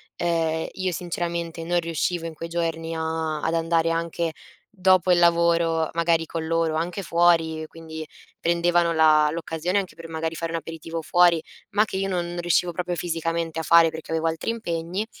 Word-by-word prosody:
E 165 -2 0
io 185 -1 -2
sinceramente 170 -1 -3
non 175 0 +2
riuscivo 165 +1 -2
in 165 - -7
quei 165 - -6
giorni 165 -1 -2
a 160 -1 -2
ad 165 - 0
andare 165 0 +1
anche 165 0 -1 0.4
dopo 185 -2 +3
il 175 - +5
lavoro, 170 -1 +3
magari 165 -1 +2
con 160 0 -4
loro, 165 -1 +1
anche 175 +4 -2
fuori, 165 -2 +2
quindi 160 -1 -9 0.3
prendevano 170 0 +2
la 155 -1 +5
l'occasione 170 +3 -1
anche 190 - -6
per 165 0 -10
magari 160 0 -3
fare 165 0 -3
un - - 0
aperitivo 165 0 -6
fuori, 175 0 +4 0.3
ma 205 +2 +4
che 190 - -5
io 195 0 -1
non 175 -1 -2
riuscivo 175 0 +2
proprio 175 +1 -3
fisicamente 165 -1 -2
a - - -3
fare, 165 +1 +6
perché 160 0 -8
avevo 165 0 0
altri 165 +7 -1
impegni. 180 -2 -3
165 Hz, 175 wpm, -24 LUFS, 160-175 Hz, 0.4 s, fare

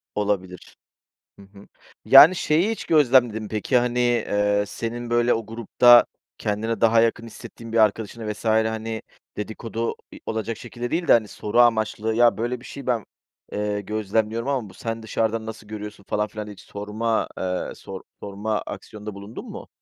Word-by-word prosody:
Olabilir. 95 -4 -3 0.6
Hı - - -13
hı. 100 0 -16 0.4
Yani, 175 +4 +9
şeyi 170 +8 +2
hiç 225 - -4
gözlemledin 125 -7 +4
mi 105 - -7
peki? 110 +4 0
Hani, 125 0 -1
eee, 105 -4 +1
senin, 120 +3 -5
böyle, 120 +1 +3
o 115 -2 -4
grupta 120 +2 +5 0.3
kendine 110 +2 -2
daha 115 0 +5
yakın 115 0 0
hissettiğin 115 0 -11
bir 115 - +1
arkadaşına 110 0 +1
vs. 105 - -13
hani, 110 0 0 0.3
dedikodu, 115 +2 -4 0.2
i - - -11
olacak 110 0 -3
şekilde 120 0 -6
değil 170 -1 -1
de, - - +8
hani, 110 -3 +4
soru 105 +3 0
amaçlı 110 -1 +2
"Ya, 120 -1 +4
böyle 120 +1 -2
bir - - -16
şey 140 - -9
ben, 120 -5 0 0.5
eee, 105 0 -2
gözlemliyorum 110 +3 -1
ama 130 -7 -1
bu - - -16
sen 115 0 -5
dışarıdan 110 0 -1
nasıl 110 -1 -8
görüyorsun?" 105 -1 -8
falan 105 0 0
filan 105 -1 -7
hiç 105 - -11
sorma, 105 +3 -2
eee, 90 -1 -2
sor - - -9 0.2
sorma 105 +2 -3
aksiyonunda 105 -1 -8
bulundun 100 +3 -9
mu? - - -9
110 Hz, 165 wpm, -23 LUFS, 105-120 Hz, 0.6 s, Yani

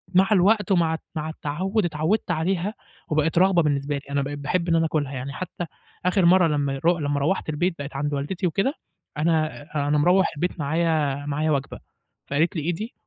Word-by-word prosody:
مع 190 +2 +5
الوقت 205 +1 +3
ومع 165 -3 +3 0.2
مع 155 0 -3
التعوّد 180 +7 -1
اتعوّدت 170 +5 0
عليها 180 +5 0 0.4
وبقت 155 +2 +1
رغبة 180 -2 +5
بالنسبة 145 -1 0
لي. 140 - -6
أنا 140 0 0
بقيت 145 +1 -4
باحب 170 +5 -1
إن 165 - +4
أنا 165 0 +3
آكلها، 150 -3 -1
يعني 130 +2 -5
حتّى 180 0 -5 0.4
آخر 180 0 +3
مَرّة 180 0 +6
لمّا 145 -3 0
يرو 170 +6 +2
لمّا 145 -1 0
روّحت 155 +3 0
البيت 165 +4 0
بقيت 140 0 -6
عند 145 +1 -1
والدتي 170 +7 -1
وكده 195 - 0 0.4
أنا 155 -1 +1 0.3
أنا 150 - +2
مروّح 180 +6 +4
البيت 180 +1 -2
معايا 150 -2 0
معايا 150 +2 0
وجبة، 140 -1 -2 0.5
فقالت 160 +7 +1
لي: 160 - -1
"إيه 170 +4 -1
دي؟" 215 +8 -6
160 Hz, 190 wpm, -24 LUFS, 145-180 Hz, 0.5 s, مَرّة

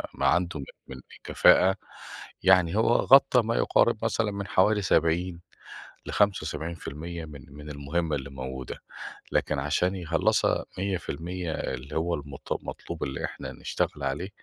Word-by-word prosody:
ما - - -1
عنده 90 -3 +1
من 70 - -6 0.2
من 65 -1 -8 0.2
كفاءة 95 +1 +5 0.7
يعني 90 -2 +5
هو 110 - +3
غطى 135 -2 +6
ما 115 +1 -1
يقارب 115 -1 +2
مثلًا 115 -2 0
من 100 0 -5
حوالي 105 +3 +3
70 85 0 +1 0.7
ل75% 85 -3 -2
من 70 -5 -11
من 75 +1 -10
المهمة 75 +3 -2
اللي 70 0 -7
موجودة. 65 -1 -6 0.5
لكن 75 - +1
عشان 75 +7 0
يخلّصها 90 -4 +1
100% 90 -2 -3
اللي 65 +1 -5
هو 85 +2 0
المط 70 -1 -6
المطلوب - - -6
اللي 70 0 -3
إحنا - - -7
هنشتغل 75 - -3
عليه، 70 +8 -2
85 Hz, 135 wpm, -27 LUFS, 70-95 Hz, 0.7 s, غطى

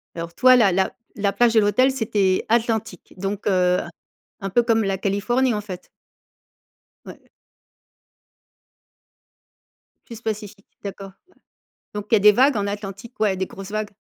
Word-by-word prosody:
Alors, 170 0 -6
toi, 255 0 +6
la 220 -6 +4
la 190 +2 0 0.2
la 200 -1 0
plage 240 -1 +3
et - - +7
l'hôtel, 215 +6 +3
c'était 210 -7 0
Atlantique, 225 -4 -1
donc, 195 +2 -4
heu, 180 -2 +2 0.6
un 195 - -3
peu 240 +5 +3
comme 225 -1 +2
la 195 -1 -1
Californie, 230 +7 0
en 210 - -2
fait. 190 -3 -9 1.2
Ouais. - - -13 2.8
Plus 230 -1 -10
pacifique, 210 -2 -5 0.2
d'accord, 195 -1 -7 0.2
ouais. - - -28 0.6
Donc, 210 0 -5
il - - +7
y - - +2
des 210 +1 +7
vagues 265 +4 +3
en 200 - -1
Atlantique, 205 +3 -7
ouais? 205 -3 +2
Des 190 0 -2
grosses 195 +1 -10
vagues? 215 0 -2
205 Hz, 150 wpm, -22 LUFS, 195-225 Hz, 2.8 s, et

